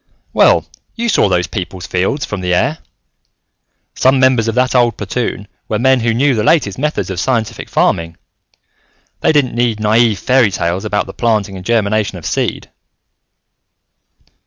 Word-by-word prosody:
"Well, - - +4 0.3
you 235 0 -2
saw 105 - +3
those 90 -1 +1
people's 95 -2 -6
fields 95 +12 -1
from 105 -3 -5
the 90 -1 0
air. 140 - 0 1.1
Some 130 +1 +2
members 130 -3 +3
of 115 - -1
that 125 +1 +1
old 120 -2 +2
platoon 105 0 -3 0.2
were 110 - 0
men 130 +3 +3
who 115 0 0
knew 135 +4 +2
the 110 -3 0
latest 125 - +1
methods 150 -8 -2
of 90 - -4
scientific 115 +1 -2
farming. 85 0 0 1.0
They - - +2
didn't 145 -5 +1
need 120 -2 0
naive 110 0 +2
fairy 125 -2 +3
tales 90 0 -2
about 105 - -1
the - - -10
planting 110 -4 -1
and 95 - -8
germination 110 -2 0
of 85 - -11
seed." - - -2
115 Hz, 160 wpm, -15 LUFS, 95-130 Hz, 1.1 s, Well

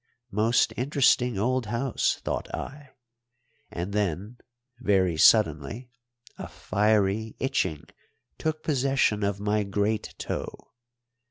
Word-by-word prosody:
Most 110 +4 +2
interesting 125 -3 +2
old 125 +3 0
house, 120 +4 0
thought - - -3
I; 145 -1 -8 0.8
and 90 +4 -5
then 105 +3 -2 0.4
very 95 -7 +2
suddenly 80 - +3 0.5
a - - -5
fiery 105 +1 0
itching 95 - -1 0.6
took 155 0 -2
possession 135 -6 +1
of 100 0 -1
my 105 +1 0
great 105 +2 -2
toe. - - -6
110 Hz, 100 wpm, -26 LUFS, 100-125 Hz, 0.8 s, suddenly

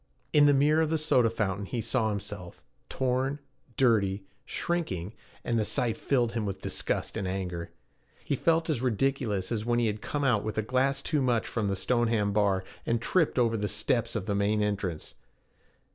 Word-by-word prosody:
In 145 -1 +7
the - - +6
mirror 150 +3 +4
of 160 - +1
the 160 - +1
soda 125 -6 +3
fountain 100 -3 -2
he 120 - -3
saw 115 0 0
himself, 100 -3 -5 0.3
torn, 130 +2 0 0.4
dirty, 100 -6 +2 0.2
shrinking, 105 - -2 0.3
and 115 -1 0
the - - +2
sight 115 +2 0
filled 120 -4 +1
him 115 -2 -2
with 100 -2 -3
disgust - - -2
and 95 - -2
anger. 90 -3 -3 0.6
He - - -1
felt 165 0 +2
as 150 -8 0
ridiculous 120 -5 0
as 110 -3 -1
when 120 +1 +1
he 120 - +2
had 105 -1 -2
come 145 -1 -2
out 120 -6 +2
with 110 - -4
a 110 - +1
glass 135 +4 +1
too 150 - 0
much 120 -3 +1
from 110 -3 -2
the 100 - 0
Stoneham 110 0 +1
bar, 100 -2 +2 0.2
and 115 0 0
tripped 165 +6 +1
over 115 -2 +3
the 105 -1 -1
steps 115 +4 -1
of 105 -4 -2
the 105 - -1
main 105 +1 +1
entrance. 95 -6 -3
115 Hz, 190 wpm, -28 LUFS, 100-130 Hz, 0.6 s, In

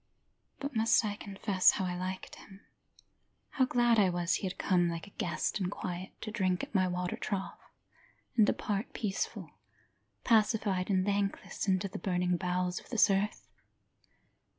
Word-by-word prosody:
But 280 -1 -5
must 225 +1 +4
I 205 -1 -2
confess 195 -2 +2
how 190 - -1
I 180 -1 -2
liked 185 +1 -5
him, 195 0 -14 0.9
How 260 - +2
glad 240 -2 +3
I 195 -3 +5
was 175 0 0
he 195 - 0
had 180 - -6
come 175 -2 +2
like 165 -1 -4
a 200 - -15
guest 175 +4 -2
in 180 - 0
quiet, 185 -1 -6
to 215 - -5
drink 185 -4 0
at - - -7
my 185 -2 +3
water 180 0 -2
trough 195 -2 -4 0.8
And 215 -3 +5
depart 205 0 -1
peaceful, 200 -4 -3 0.7
pacified, 210 -4 +2
and 185 -2 +2
thankless, 200 -1 -1
Into 190 +1 +2
the 190 - -7
burning 180 0 0
bowels 180 0 -1
of - - -18
this 230 -4 +4
earth? 195 +2 -1
195 Hz, 160 wpm, -31 LUFS, 180-210 Hz, 0.9 s, I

